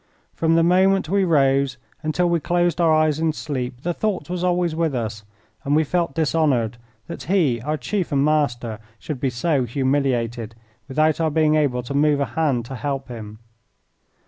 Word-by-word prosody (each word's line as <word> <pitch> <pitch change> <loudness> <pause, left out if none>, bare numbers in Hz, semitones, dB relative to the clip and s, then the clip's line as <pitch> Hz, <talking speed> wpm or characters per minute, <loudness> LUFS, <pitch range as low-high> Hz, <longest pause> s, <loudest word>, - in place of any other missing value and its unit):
From 165 0 +1
the 165 - +4
moment 190 +1 +3
we 195 +1 +2
rose 135 -5 +2 0.2
until 155 +3 0
we 170 -1 +1
closed 175 +2 0
our 165 -1 +4
eyes 155 -1 +2
in 160 -1 +1
sleep 125 -5 -4
the 175 - -1
thought 200 -2 -2
was 180 -1 -2
always 175 -2 +1
with 160 -3 0
us, 110 -3 -4 0.4
and 145 +1 +1
we 155 - +4
felt 170 -2 -1
dishonoured 145 -8 +1 0.3
that 170 - -8
he, 160 - +1
our 150 +5 -2
chief 175 +8 -2
and 140 0 +2
master, 120 -7 0 0.2
should 150 +1 -6
be 135 - 0
so 135 +3 0
humiliated 120 -3 -1 0.3
without 155 +3 +1
our 160 - +2
being 155 0 +2
able 140 -5 +1
to 130 - -6
move 145 0 +3
a 140 - +1
hand 140 -8 0
to 130 - -7
help 135 +1 -3
him. 110 -3 -8
150 Hz, 180 wpm, -22 LUFS, 130-165 Hz, 0.4 s, the